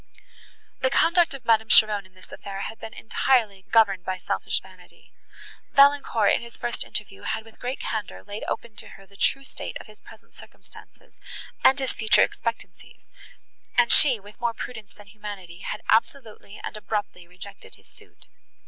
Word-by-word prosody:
The -, -, +2 dB
conduct 340 Hz, -, +3 dB
of 260 Hz, -3 st, -12 dB
Madame 220 Hz, -1 st, +3 dB
Cheron 210 Hz, -3 st, +5 dB
in 185 Hz, -, -31 dB
this 185 Hz, -, -18 dB
affair 195 Hz, -1 st, -7 dB
had 220 Hz, -, -6 dB
been 225 Hz, -, -8 dB
entirely 220 Hz, -5 st, +1 dB
governed 205 Hz, -5 st, +4 dB
by 185 Hz, 0 st, -3 dB
selfish -, -, -1 dB
vanity. -, -, -19 dB, 0.6 s
Valancourt, 275 Hz, -6 st, +5 dB
in -, -, +1 dB
his 235 Hz, -1 st, -12 dB
first 240 Hz, -, -2 dB
interview, 195 Hz, -2 st, -5 dB
had 220 Hz, 0 st, -3 dB
with 225 Hz, -, -18 dB
great 250 Hz, +2 st, -4 dB
candour 215 Hz, -3 st, -4 dB
laid 205 Hz, +1 st, -7 dB
open 230 Hz, -2 st, -4 dB
to -, -, -6 dB
her 195 Hz, -, -16 dB
the 200 Hz, +1 st, -21 dB
true 275 Hz, +6 st, +1 dB
state -, -, -7 dB
of -, -, -11 dB
his 215 Hz, -1 st, -17 dB
present 220 Hz, -, -17 dB
circumstances, -, -, -15 dB, 0.5 s
and 265 Hz, -, +6 dB
his 265 Hz, -2 st, -2 dB
future 220 Hz, -1 st, +4 dB
expectancies, 230 Hz, -1 st, -5 dB, 0.7 s
and 240 Hz, -1 st, +5 dB
she, 260 Hz, -7 st, +6 dB
with 205 Hz, +3 st, -16 dB
more 235 Hz, -1 st, 0 dB
prudence 220 Hz, -3 st, -8 dB
than 205 Hz, -, -16 dB
humanity, 200 Hz, -4 st, -9 dB
had -, -, -6 dB
absolutely 225 Hz, -2 st, 0 dB
and -, -, -5 dB
abruptly 205 Hz, -4 st, -4 dB
rejected 185 Hz, +3 st, -12 dB
his -, -, -20 dB
suit. -, -, -19 dB
220 Hz, 170 wpm, -25 LUFS, 200-240 Hz, 0.7 s, and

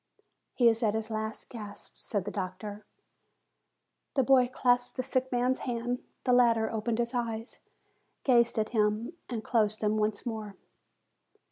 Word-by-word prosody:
"He 240 Hz, -, +5 dB
is 225 Hz, 0 st, +3 dB
at 220 Hz, -2 st, +2 dB
his 220 Hz, 0 st, -3 dB
last 220 Hz, 0 st, -3 dB
gasp," 210 Hz, -4 st, -9 dB
said 200 Hz, -4 st, -3 dB
the 205 Hz, -, -3 dB
doctor. 200 Hz, +2 st, -5 dB, 1.3 s
The 270 Hz, -, +4 dB
boy 255 Hz, -1 st, +5 dB
clasped 245 Hz, -1 st, +2 dB
the 255 Hz, -, 0 dB
sick 260 Hz, 0 st, -1 dB
man's 250 Hz, +1 st, +1 dB
hand. 245 Hz, 0 st, -2 dB, 0.2 s
The 250 Hz, -, +3 dB
latter 230 Hz, -3 st, +4 dB
opened 225 Hz, +1 st, -1 dB
his 235 Hz, +1 st, 0 dB
eyes, 230 Hz, -2 st, -3 dB, 0.6 s
gazed 235 Hz, -3 st, +4 dB
at 215 Hz, 0 st, +1 dB
him, 215 Hz, +4 st, +1 dB, 0.2 s
and 230 Hz, -3 st, -3 dB
closed 215 Hz, -2 st, +1 dB
them 215 Hz, 0 st, +1 dB
once 210 Hz, -1 st, -1 dB
more. 215 Hz, -4 st, -4 dB
230 Hz, 150 wpm, -30 LUFS, 215-245 Hz, 1.3 s, He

